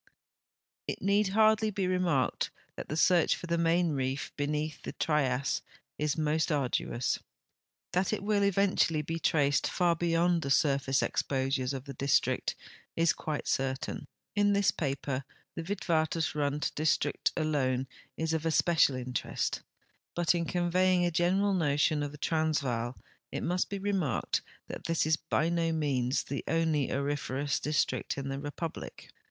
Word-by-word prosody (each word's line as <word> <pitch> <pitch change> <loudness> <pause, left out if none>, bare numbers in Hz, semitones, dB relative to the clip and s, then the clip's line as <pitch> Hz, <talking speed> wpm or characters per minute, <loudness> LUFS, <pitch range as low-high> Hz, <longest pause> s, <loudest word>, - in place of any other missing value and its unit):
It - - -3
need 200 +2 +2
hardly 215 +2 +4
be 195 -2 -1
remarked 180 -7 +1 0.3
that - - -7
the 155 - -2
search 175 -1 +4
for - - -8
the 170 0 0
Main 170 0 +2
Reef 135 -1 -2
lieneath 150 +1 -2
the - - -6
Trias 140 -4 0 0.4
is 150 0 0
most 155 +1 +1
arduous. 130 -3 0 0.7
That 180 +1 +1
it 215 -2 -2
will 205 0 +2
eventually 195 -5 +2
be 165 +2 -3
traced 145 -3 +2
far 175 -2 +2
beyond 170 +1 +2
the 140 - -3
surface 135 -2 +2
exposures 135 -1 0
of 135 -1 -5
the 140 - -7
district 140 +2 +1 0.4
is 165 0 +3
quite 155 -2 -4
certain. 135 0 -2 0.3
In 205 0 +3
this 200 -1 +3
paper 140 -2 -2 0.3
the - - -4
Witwatersrand 160 -5 -1
district 155 +1 +1
alone 135 -5 +1 0.3
is 160 0 -1
of 160 -1 -1
especial 165 -3 +3
interest, 125 -1 -2 0.5
but 175 0 +3
in 170 -1 -1
conveying 180 +1 +2
a 175 - +1
general 190 +4 +2
notion 150 -2 +2
of 145 -1 -3
the 150 - -10
Transvaal 140 -7 0 0.3
it - - -3
must 180 +1 0
be 200 - -3
remarked 195 -7 0 0.2
that - - -8
this 165 -2 +1
is 155 0 +3
by 160 0 0
no 170 -1 +1
means 140 -5 0
the 140 - -4
only 160 -3 +1
auriferous 140 0 -1
district 150 -1 -1
in 135 0 -4
the 135 0 -3
reiiublic. 145 +3 -6
155 Hz, 145 wpm, -30 LUFS, 140-175 Hz, 0.7 s, hardly